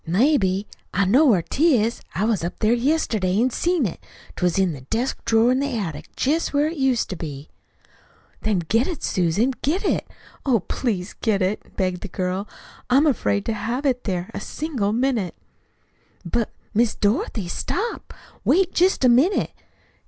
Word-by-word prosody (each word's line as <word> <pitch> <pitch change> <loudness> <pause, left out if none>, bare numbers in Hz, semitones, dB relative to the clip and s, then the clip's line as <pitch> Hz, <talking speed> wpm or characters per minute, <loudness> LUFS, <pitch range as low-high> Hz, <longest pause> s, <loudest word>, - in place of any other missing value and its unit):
"Maybe. 195 - +2 0.3
I 195 +1 +3
know 260 +11 +5
where 195 -9 +4
'tis. 250 - +2
I 195 - +1
was 220 -6 +1
up 170 - -4
there 220 +1 +3
yesterday 235 - +1
an' 255 +2 +2
see 355 +8 +1
it. 205 -10 -1 0.4
'T - - -9
was 180 0 +2
in 190 -2 +3
the 135 - -9
desk 230 - -2
drawer 225 +2 +4
in 255 - +2
the 275 -4 -1
attic, 160 -8 -5
jest 300 +2 0
where 290 +1 +3
it 325 +1 -5
used 265 -4 +1
to - - -3
be." 150 -3 -7 0.9
"Then 200 -5 0
get 225 - +2
it, 345 -6 -5
Susan, 185 +9 +1
get 355 +9 0
it. - - 0 0.4
Oh, 245 -7 +2
please 200 -3 -2
get 210 -4 +2
it," 190 +3 -3
begged 185 -2 -1
the - - -5
girl. 185 +2 -3 0.4
"I'm 270 +5 +5
afraid 210 -7 +1
to 225 - 0
have 235 +6 -3
it 255 -2 0
there 180 -3 -2
a - - -4
single 265 -10 -2
minute." 235 -5 0 0.9
"But, 225 +6 -1 0.2
Miss 230 +1 +2
Dorothy, 205 -1 0
stop; 400 - -3 0.3
wait 370 0 +3
jest 360 -6 +3
a - - +7
minute. 275 +12 +3
225 Hz, 175 wpm, -23 LUFS, 190-270 Hz, 0.9 s, a